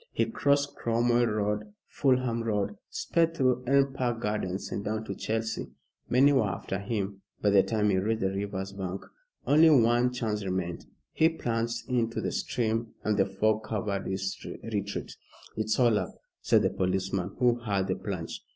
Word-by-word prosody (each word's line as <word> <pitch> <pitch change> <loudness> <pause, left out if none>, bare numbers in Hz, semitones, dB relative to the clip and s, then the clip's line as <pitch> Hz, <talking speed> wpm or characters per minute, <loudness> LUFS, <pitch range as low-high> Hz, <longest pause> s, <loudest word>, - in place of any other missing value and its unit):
He - - +1
crossed 140 0 +1
Cromwell 120 +1 +2
Road, 105 0 -1
Fulham 125 -4 +1
Road, 105 - -1
sped 170 - 0
through 125 -1 +2
Elm 135 0 +3
Park 120 -3 -1
Gardens, 105 -4 -2
and 100 - -3
down 110 +1 -2
to - - -5
Chelsea. 110 0 -2 0.4
Many 135 +4 +5
were 115 -7 +3
after 95 +1 -4
him 100 -2 -3 0.2
by 105 - +2
the 100 -1 +7
time 105 0 +1
he 95 - +2
reached 110 +3 0
the 95 0 +1
river's 95 -1 -3
bank. 95 -1 -5 0.4
Only 155 +3 +6
one 120 -3 +4
chance 110 -5 -2
remained. 90 -2 -3 0.3
He 160 - +4
plunged 115 -6 -2
into 120 -3 0
the - - -2
stream 115 -1 -1
and 110 - +1
the 100 - +2
fog 110 +3 +1
covered 100 -2 -2
his 95 0 -2 0.3
retreat. 100 -3 -4 0.4
"It's 110 0 0
all 120 -4 +4
up," - - -5 0.3
said - - +4
the - - +2
policeman, 95 0 -1
who 120 -1 +3
heard 100 -5 0
the 95 -1 -1
plunge. 95 -5 -5
110 Hz, 170 wpm, -28 LUFS, 100-120 Hz, 0.4 s, the